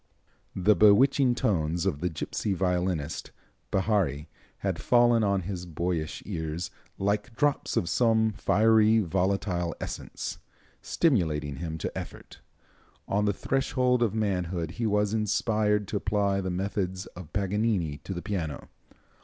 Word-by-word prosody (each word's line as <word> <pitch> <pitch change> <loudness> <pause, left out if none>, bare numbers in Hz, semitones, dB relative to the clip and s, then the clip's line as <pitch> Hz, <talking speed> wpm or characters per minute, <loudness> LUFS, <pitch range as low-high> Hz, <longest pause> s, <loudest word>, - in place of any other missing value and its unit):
The 100 +3 +4
bewitching 125 +4 +5
tones 85 - 0
of 70 - 0
the 90 +3 -1
gipsy 95 +5 -3
violinist, 90 -4 -1 0.4
Bihary, 95 -8 +1 0.4
had - - -1
fallen 120 -2 +4
on 100 -2 +1
his 90 -1 -5
boyish 85 -1 -3
ears 80 -3 -4 0.3
"like 105 +4 -1
drops 145 +1 0
of 85 - +1
some 110 +2 +3
fiery, 110 +1 +4
volatile 90 -2 0
essence," - - -5 0.4
stimulating 80 - 0
him 80 -1 -4
to - - -5
effort. - - -8 0.7
On 105 +1 +1
the 105 - +3
threshold 130 +2 0
of 110 -3 +1
manhood 90 -6 -1
he 115 +5 -2
was 105 0 +1
inspired 105 -1 +1
to 105 - -1
apply 100 -1 0
the 95 - -3
methods 95 0 -2
of 90 -4 -10
Paganini 100 -5 0
to 95 - -6
the 85 - -5
piano. 85 -7 -4
100 Hz, 130 wpm, -28 LUFS, 85-110 Hz, 0.7 s, bewitching